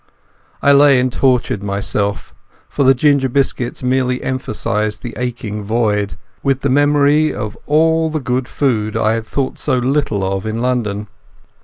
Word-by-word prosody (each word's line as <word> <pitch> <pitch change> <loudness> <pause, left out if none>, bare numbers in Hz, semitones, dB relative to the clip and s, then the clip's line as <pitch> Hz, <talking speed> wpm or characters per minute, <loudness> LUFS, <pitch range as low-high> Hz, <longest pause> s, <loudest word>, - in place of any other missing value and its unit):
I 140 - +5
lay 140 -2 +6
and 125 0 0
tortured 125 -6 +1
myself—for 100 +6 -4
the 135 0 +5
ginger 140 0 +2
biscuits 130 -2 -1
merely 125 0 0
emphasized 110 -4 -2
the 120 - -6
aching 115 -4 -4
void—with 105 +3 -2
the 140 - 0
memory 145 +2 +3
of 105 -1 -5
all 160 +2 +3
the 155 0 -2
good 125 -1 -2
food 110 -7 -1
I 110 - +2
had 115 -1 -3
thought 135 -2 -3
so 130 - 0
little 125 -5 0
of 95 +2 -2
in 110 +1 -3
London. 115 -5 -1
125 Hz, 145 wpm, -17 LUFS, 105-140 Hz, -, lay